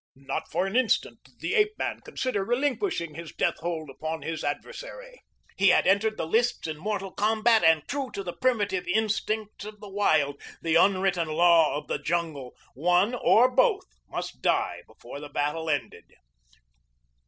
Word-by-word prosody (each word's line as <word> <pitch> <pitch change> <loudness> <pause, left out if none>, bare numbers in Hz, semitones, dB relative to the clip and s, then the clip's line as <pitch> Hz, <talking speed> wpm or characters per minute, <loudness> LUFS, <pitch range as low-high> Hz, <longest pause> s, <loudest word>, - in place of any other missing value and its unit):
Not 135 0 -5
for 175 +4 0
an 195 +3 -4
instant 255 -2 +1
did - - -24
the - - -2
ape 425 -1 +2
man - - -3
consider 255 -7 -3
relinquishing 245 - -1
his 165 +1 -8
death - - 0
hold 165 -2 -4
upon 155 +4 -5
his 165 -1 -4
adversary. - - -6 0.4
He 195 - +4
had - - +4
entered 215 +3 +2
the - - -2
lists 235 +9 +1
in 155 -2 -5
mortal 195 +1 -3
combat 220 +2 +2
and 160 -2 +4
true 275 -2 -3
to 195 - -4
the 175 -2 -5
primitive 205 -7 0
instincts 215 +1 -1
of 210 0 -9
the 205 - -10
wild 155 -8 +1 0.2
the 165 -1 -1
unwritten 185 -1 +3
law 165 -1 +4
of 150 - -6
the - - -3
jungle 160 -7 -3 0.2
one 180 - +2
or 245 0 +5
both 410 - +3 0.2
must - - -6
die - - 0
before 140 - -11
the 145 0 -9
battle 150 +3 -2
ended. 145 -2 -3
190 Hz, 165 wpm, -27 LUFS, 160-225 Hz, 0.4 s, or